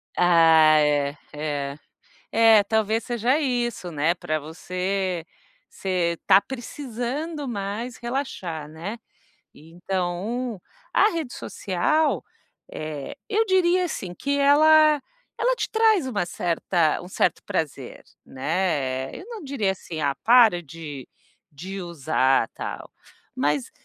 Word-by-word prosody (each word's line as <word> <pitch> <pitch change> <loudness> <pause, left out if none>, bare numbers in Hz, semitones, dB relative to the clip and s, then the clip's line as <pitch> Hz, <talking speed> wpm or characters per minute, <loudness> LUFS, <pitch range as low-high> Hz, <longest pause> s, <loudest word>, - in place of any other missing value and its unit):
Ah 165 -3 +6
é, 145 -1 +1 0.2
é, 145 -2 -3 0.6
é 225 -2 +6
talvez 220 +1 0
seja 240 +4 +1
isso, 240 - -1
né, 155 +2 +1
para 155 -3 -2
você 180 +3 -3 0.4
você 180 -3 -1
está 190 - +5
precisando 270 +5 -5
mais 215 +2 -4
relaxar, 215 - -4
né, 165 +8 -6 0.6
então, 185 +7 -4 0.3
a 420 - +5
rede 320 -8 -4
social, 290 - 0 0.5
eh, 155 -3 -6
eu 445 +1 +2
diria 365 -2 +3
assim 190 - -5
que 280 +9 -2
ela, 305 +1 +6 0.4
ela - - +2
te - - -3
traz 440 -7 +3
uma 210 -8 -1
certa 170 -2 0
um 175 - -10
certo 185 - 0
prazer, 165 -7 -4 0.2
né, 135 -3 -2
eu - - -9
não 460 -3 -7
diria 265 -9 -1
assim, 170 -4 -7
ah, 140 -2 +1
para 230 -7 +6
de 150 -4 -9 0.4
de 190 +7 -7
usar, 140 -7 +1
tal, - - -7 0.4
mas, 145 -1 0
190 Hz, 115 wpm, -24 LUFS, 160-255 Hz, 0.6 s, Ah